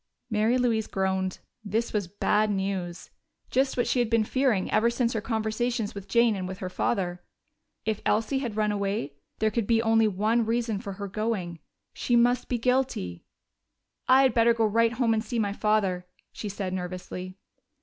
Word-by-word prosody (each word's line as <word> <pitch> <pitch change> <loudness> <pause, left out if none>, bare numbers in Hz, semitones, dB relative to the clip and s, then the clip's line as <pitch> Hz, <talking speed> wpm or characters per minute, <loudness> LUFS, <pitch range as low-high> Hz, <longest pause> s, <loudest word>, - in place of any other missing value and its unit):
Mary 220 +3 +2
Louise 230 -3 +1
groaned. 190 -1 -1 0.3
This 220 +3 -1
was 205 -4 0
bad 210 +3 +1
news 190 -3 -3 0.4
just 265 +1 +1
what 245 - +2
she 255 - +1
had 240 -2 +1
been 230 -1 +3
fearing 245 -4 +1
ever 225 +2 +3
since 235 0 0
her 220 - -1
conversations 220 0 -1
with 200 -1 -8
Jane 235 -2 +3
and 185 -2 -4
with 190 0 -6
her 185 -1 -5
father. 180 -3 -1 0.6
If 220 -1 -1
Elsie 225 +6 +1
had 235 -6 -4
run 210 -1 +2
away, 200 -7 -2 0.2
there 220 0 +1
could 230 -3 -1
be 230 -1 +3
only 225 -1 +3
one 215 +4 +1
reason 225 -2 -1
for 200 -2 -6
her 200 +1 -6
going: 195 -5 -3 0.3
she 240 - 0
must 245 +1 +3
be 245 - +1
guilty! 250 - -1 0.8
"I 260 +1 +6
had 260 -3 +3
better 230 0 +4
go 225 -1 +2
right 230 +2 +2
home 235 -2 +2
and 220 0 0
see 235 +2 -4
my 205 -3 0
father," 200 -4 0 0.3
she 210 - -5
said 195 -2 -4
nervously. 180 0 -6
215 Hz, 180 wpm, -27 LUFS, 195-235 Hz, 0.8 s, I